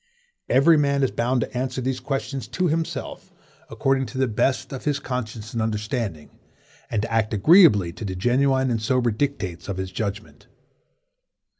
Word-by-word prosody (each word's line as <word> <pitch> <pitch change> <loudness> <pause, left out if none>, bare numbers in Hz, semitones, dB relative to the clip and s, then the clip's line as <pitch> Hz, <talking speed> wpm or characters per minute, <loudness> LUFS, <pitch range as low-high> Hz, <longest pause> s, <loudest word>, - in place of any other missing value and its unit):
Every 145 +5 +5
man 140 -1 +1
is 135 - +1
bound 125 +1 0
to 125 - -5
answer 130 +1 -2
these 130 0 -2
questions 135 +1 -4
to 180 - -1
himself, 165 0 -3 0.4
according 135 -1 0
to 130 +4 -8
the 130 0 +2
best 130 +5 0
of 130 - -7
his 145 -2 +1
conscience 115 -2 -5
and 115 - -1
understanding, 105 -5 -3 0.5
and 105 -2 -1
to 115 - -4
act 110 -1 +1
agreeably 105 - +6
to 110 - -9
the 95 -3 -4
genuine 130 +5 +2
and 115 -2 -1
sober 120 +1 +1
dictates 105 -9 -3
of 100 - -3
his 95 0 -4
judgment. 105 0 -5
125 Hz, 165 wpm, -23 LUFS, 110-135 Hz, 0.5 s, agreeably